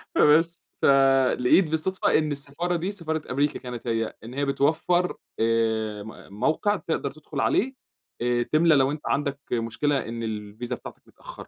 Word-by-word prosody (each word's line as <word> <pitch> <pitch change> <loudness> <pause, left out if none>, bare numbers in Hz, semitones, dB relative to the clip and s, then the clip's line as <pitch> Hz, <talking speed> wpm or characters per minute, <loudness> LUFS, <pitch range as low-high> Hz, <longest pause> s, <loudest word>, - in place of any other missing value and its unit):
فبس 165 +3 +4 0.2
فلقيت 135 +3 +4
بالصدفة 160 +4 +1
إن 155 -1 0
السفارة 145 +5 -3
دي، 175 +4 -2
سفارة 160 -5 -3
أمريكا 145 +3 0
كانت 125 -1 -7
هي، 115 -1 -1
إن 115 - -9
هي 140 +1 -1
بتوفر 160 +6 +1 0.2
آآ، 110 -2 0
م 110 -2 -12
موقع 160 - +2
تقدر 165 -3 -3
تدخل 155 -2 -8
عليه. 265 +5 +1 0.5
آآ، 120 0 +1
تملى 160 +3 +4
لو 135 0 +3
أنت 150 0 -5
عندك 140 0 -1
مشكلة 120 +4 0
إن 115 0 -5
الفيزا 110 +3 -5
بتاعتك - - -11
متأخّرة. - - -12
140 Hz, 150 wpm, -25 LUFS, 120-160 Hz, 0.5 s, فبس